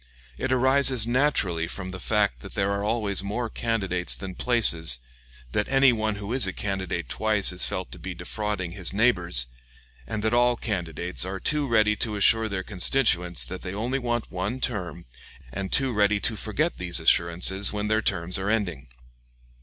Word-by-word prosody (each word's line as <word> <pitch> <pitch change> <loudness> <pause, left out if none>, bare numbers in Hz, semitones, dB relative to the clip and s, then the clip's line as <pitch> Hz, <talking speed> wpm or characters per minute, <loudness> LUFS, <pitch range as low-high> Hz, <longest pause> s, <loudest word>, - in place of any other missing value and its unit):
It 130 - -3
arises 130 -2 +4
naturally 115 - +1
from 95 +1 -6
the 90 - -7
fact 105 -1 0
that 95 - -11
there 100 0 0
are 100 0 -2
always 105 -3 +1
more 110 +4 -3
candidates 95 -6 -1
than 95 -1 -7
places, 85 - +2 0.5
that 105 - -1
any 135 -1 +4
one 110 -2 -1
who 100 +3 -5
is 130 -6 +4
a 95 - -3
candidate 95 -8 -3
twice 100 - +1
is 90 - +3
felt 95 -1 -4
to 90 - -8
be 90 +2 -6
defrauding 90 0 -4
his 90 -1 -2
neighbors, 90 - +3 0.6
and 110 -2 -4
that 110 +1 0
all 120 0 +3
candidates 90 -6 -3
are 95 +1 -4
too 150 +6 0
ready 110 -3 +3
to 110 -2 -1
assure 110 +2 +3
their 95 -2 -3
constituents 90 -3 +2
that 95 - -7
they 90 +1 -6
only 120 +6 -2
want 120 -2 -3
one 100 +7 -3
term, 90 - -3 0.5
and 95 +4 -4
too 135 -3 +2
ready 105 -1 +2
to 115 - 0
forget 135 - -2
these 90 -2 -1
assurances 85 +4 +2
when 105 0 -3
their 110 +1 +1
terms 90 -3 -1
are 95 +2 -2
ending. 90 -11 -2
100 Hz, 175 wpm, -25 LUFS, 90-115 Hz, 0.6 s, arises